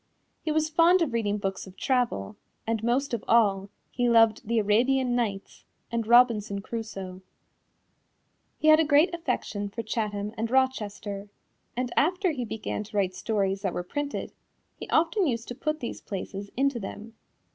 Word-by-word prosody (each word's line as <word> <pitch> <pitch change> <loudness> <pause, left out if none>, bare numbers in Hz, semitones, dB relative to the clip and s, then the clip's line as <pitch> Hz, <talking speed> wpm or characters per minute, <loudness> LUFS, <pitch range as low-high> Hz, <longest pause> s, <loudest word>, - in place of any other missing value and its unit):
He 315 - -2
was 310 0 +2
fond 335 +3 +4
of 270 -7 -3
reading 210 -3 0
books 195 -1 -4
of 190 - -14
travel, 245 - 0 0.3
and 225 -1 -1
most 250 +3 0
of 230 - -2
all 200 -4 +3 0.2
he 245 -1 +1
loved 225 -2 +4
The 230 +1 +1
Arabian 245 +4 +2
Nights 205 -5 -3 0.3
and 230 -2 -1
Robinson 230 -4 +4
Crusoe. 195 -5 -6 1.4
He 310 - +3
had 310 0 +8
a - - +5
great 310 +4 +4
affection 245 -10 -2
for 230 +3 -5
Chatham 210 -2 -3
and 225 +1 -1
Rochester, 210 -6 -1 0.5
and 250 -1 -2
after 365 +4 +2
he 255 -5 -3
began 215 -1 -4
to 210 - -6
write 190 -2 +1
stories 195 -1 -1
that 190 -3 -1
were 180 - -2
printed, 285 +10 -4 0.4
he - - -9
often 335 +3 +2
used 230 -3 -2
to - - -3
put 305 +4 -3
these 235 - -5
places 200 0 -6
into 275 -2 +1
them. 215 +2 -8
230 Hz, 165 wpm, -27 LUFS, 205-265 Hz, 1.4 s, had